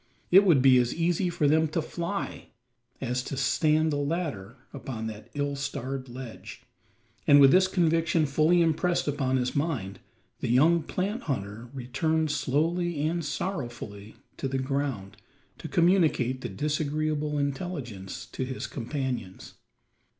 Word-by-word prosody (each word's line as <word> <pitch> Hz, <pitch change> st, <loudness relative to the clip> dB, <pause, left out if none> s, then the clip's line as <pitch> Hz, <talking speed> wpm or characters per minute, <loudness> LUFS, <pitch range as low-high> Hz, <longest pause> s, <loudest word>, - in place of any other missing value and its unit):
It 195 Hz, +3 st, +8 dB
would 155 Hz, -9 st, +5 dB
be 130 Hz, -2 st, +7 dB
as 120 Hz, 0 st, 0 dB
easy 175 Hz, +2 st, +1 dB
for 170 Hz, -4 st, +1 dB
them 160 Hz, +2 st, +4 dB
to 155 Hz, +2 st, -2 dB
fly, 170 Hz, +4 st, -4 dB, 0.5 s
is 125 Hz, -1 st, -1 dB
to 135 Hz, +1 st, -6 dB
stand 155 Hz, +3 st, +2 dB
a -, -, 0 dB
ladder 145 Hz, -, -3 dB, 0.2 s
upon 130 Hz, -5 st, -5 dB
that 110 Hz, -1 st, -7 dB
ill 145 Hz, 0 st, -1 dB
starred 135 Hz, -2 st, -4 dB
ledge; 125 Hz, -2 st, -9 dB, 0.6 s
and 145 Hz, 0 st, +8 dB
with 135 Hz, -1 st, +8 dB
this 185 Hz, +3 st, +5 dB
conviction 165 Hz, -3 st, +2 dB
fully 155 Hz, +5 st, +3 dB
impressed 170 Hz, +2 st, +1 dB
upon 135 Hz, -2 st, 0 dB
his 125 Hz, -1 st, -1 dB
mind, 135 Hz, -, -2 dB, 0.4 s
the -, -, -3 dB
young 160 Hz, +8 st, +4 dB
plant 195 Hz, -, -3 dB
hunter 110 Hz, -1 st, -4 dB
returned 145 Hz, +5 st, -1 dB
slowly 160 Hz, +3 st, 0 dB
and 170 Hz, +1 st, -1 dB
sorrowfully 120 Hz, -, -5 dB, 0.2 s
to 135 Hz, -, -2 dB
the 135 Hz, 0 st, -2 dB
ground 130 Hz, -7 st, -3 dB, 0.4 s
to -, -, -6 dB
communicate 160 Hz, -8 st, +2 dB
the -, -, -4 dB
disagreeable 150 Hz, 0 st, -1 dB
intelligence 140 Hz, -, -4 dB
to -, -, -5 dB
his 130 Hz, 0 st, -4 dB
companions. 125 Hz, -6 st, -5 dB
145 Hz, 140 wpm, -27 LUFS, 130-165 Hz, 0.6 s, It